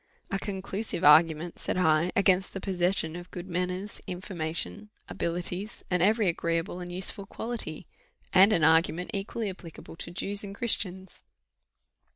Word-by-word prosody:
"A 195 Hz, -, 0 dB
conclusive 195 Hz, 0 st, -3 dB
argument," 160 Hz, +2 st, +5 dB
said. -, -, -2 dB
I, 165 Hz, 0 st, +3 dB
"against 190 Hz, -1 st, +3 dB
the -, -, -2 dB
possession 180 Hz, -3 st, 0 dB
of 175 Hz, +1 st, -8 dB
good 175 Hz, +1 st, -7 dB
manners, 180 Hz, +3 st, -2 dB
information, 180 Hz, +3 st, -4 dB, 0.2 s
abilities, 180 Hz, +5 st, -3 dB
and 180 Hz, -1 st, +2 dB
every 215 Hz, +2 st, +3 dB
agreeable 170 Hz, +1 st, -1 dB
and 175 Hz, 0 st, -6 dB
useful 190 Hz, +2 st, -4 dB
quality! 225 Hz, -9 st, -4 dB, 0.5 s
and 195 Hz, +3 st, +7 dB
an 170 Hz, -7 st, +3 dB
argument 165 Hz, +2 st, +3 dB
equally 205 Hz, +2 st, -3 dB
applicable 180 Hz, -4 st, -9 dB
to -, -, -6 dB
Jews 200 Hz, +3 st, -2 dB
and 200 Hz, -1 st, -7 dB
Christians." 190 Hz, -5 st, -1 dB
180 Hz, 140 wpm, -28 LUFS, 170-195 Hz, 0.5 s, and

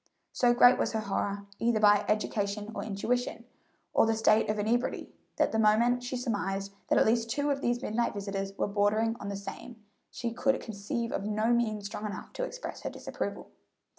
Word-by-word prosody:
So 240 Hz, -1 st, +3 dB
great 245 Hz, 0 st, +7 dB
was -, -, 0 dB
her 220 Hz, -, 0 dB
horror, 200 Hz, 0 st, -2 dB
either 230 Hz, -1 st, +2 dB
by 205 Hz, -1 st, +5 dB
education 210 Hz, 0 st, -1 dB
or -, -, -4 dB
intuition, 230 Hz, +3 st, -2 dB, 0.5 s
of -, -, +4 dB
the 225 Hz, -, +2 dB
state 220 Hz, -1 st, +3 dB
of 215 Hz, -, 0 dB
inebriety, 230 Hz, +4 st, -1 dB, 0.2 s
that -, -, +2 dB
the 220 Hz, -, 0 dB
moment 230 Hz, +3 st, +4 dB
she 245 Hz, +1 st, -4 dB
surmised 200 Hz, -4 st, -2 dB
that -, -, +3 dB
at -, -, +5 dB
least 230 Hz, +1 st, +2 dB
two 285 Hz, +4 st, 0 dB
of 275 Hz, -1 st, -1 dB
these 240 Hz, +1 st, 0 dB
midnight 235 Hz, +1 st, 0 dB
visitors 195 Hz, -1 st, -4 dB
were -, -, +1 dB
bordering 215 Hz, +3 st, +1 dB
on 200 Hz, -, -5 dB
the 200 Hz, -, -3 dB
same, 220 Hz, +3 st, -8 dB, 0.3 s
she 235 Hz, -1 st, -4 dB
could 270 Hz, +3 st, +1 dB
conceive 220 Hz, +2 st, -4 dB
of 195 Hz, -, -2 dB
no 215 Hz, +3 st, +1 dB
means 215 Hz, -4 st, 0 dB
strong 210 Hz, +1 st, -4 dB
enough 205 Hz, -, -7 dB
to -, -, -3 dB
express -, -, -6 dB
her -, -, -3 dB
disapproval. -, -, -5 dB
220 Hz, 195 wpm, -30 LUFS, 205-240 Hz, 0.5 s, great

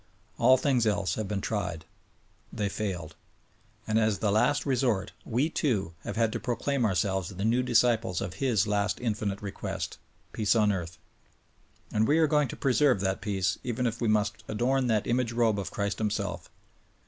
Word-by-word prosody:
All 130 Hz, +2 st, +6 dB
things 130 Hz, -3 st, +2 dB
else 100 Hz, -4 st, 0 dB
have 110 Hz, 0 st, -3 dB
been 100 Hz, -1 st, -2 dB
tried. 90 Hz, -8 st, -3 dB, 0.7 s
They 100 Hz, -1 st, -2 dB
failed. 90 Hz, -7 st, -4 dB, 0.7 s
And 110 Hz, +1 st, +2 dB
as 110 Hz, -2 st, +2 dB
the 105 Hz, -1 st, 0 dB
last 145 Hz, +7 st, +2 dB
resort, 120 Hz, -7 st, +1 dB
we, 125 Hz, +6 st, +1 dB
too, 110 Hz, -, -1 dB
have -, -, -4 dB
had 115 Hz, -1 st, +2 dB
to -, -, -2 dB
proclaim 130 Hz, +1 st, -1 dB
ourselves 95 Hz, -3 st, 0 dB
the 100 Hz, +1 st, -4 dB
new 120 Hz, +3 st, +3 dB
disciples 120 Hz, -6 st, +2 dB
of 90 Hz, -, -5 dB
His 115 Hz, -7 st, +2 dB
last 105 Hz, -1 st, 0 dB
infinite 105 Hz, -4 st, -2 dB
request: 100 Hz, -, -5 dB, 0.3 s
Peace 110 Hz, +1 st, +2 dB
on 105 Hz, -2 st, +4 dB
earth. 85 Hz, -4 st, -4 dB, 1.0 s
And 110 Hz, +1 st, +2 dB
we 150 Hz, -, +4 dB
are 165 Hz, -, +5 dB
going 150 Hz, -1 st, +2 dB
to -, -, -7 dB
preserve 135 Hz, -3 st, +3 dB
that 95 Hz, 0 st, -1 dB
peace 95 Hz, -2 st, -1 dB
even 125 Hz, +1 st, -2 dB
if 115 Hz, 0 st, -2 dB
we 115 Hz, -, +1 dB
must 105 Hz, 0 st, +1 dB
adorn 125 Hz, +4 st, +1 dB
that 110 Hz, -3 st, +1 dB
imiage 120 Hz, -1 st, 0 dB
robe 115 Hz, -3 st, +2 dB
of 100 Hz, -, -4 dB
Christ 100 Hz, 0 st, -2 dB
Himself. 105 Hz, -1 st, -2 dB
110 Hz, 175 wpm, -28 LUFS, 100-125 Hz, 1.0 s, All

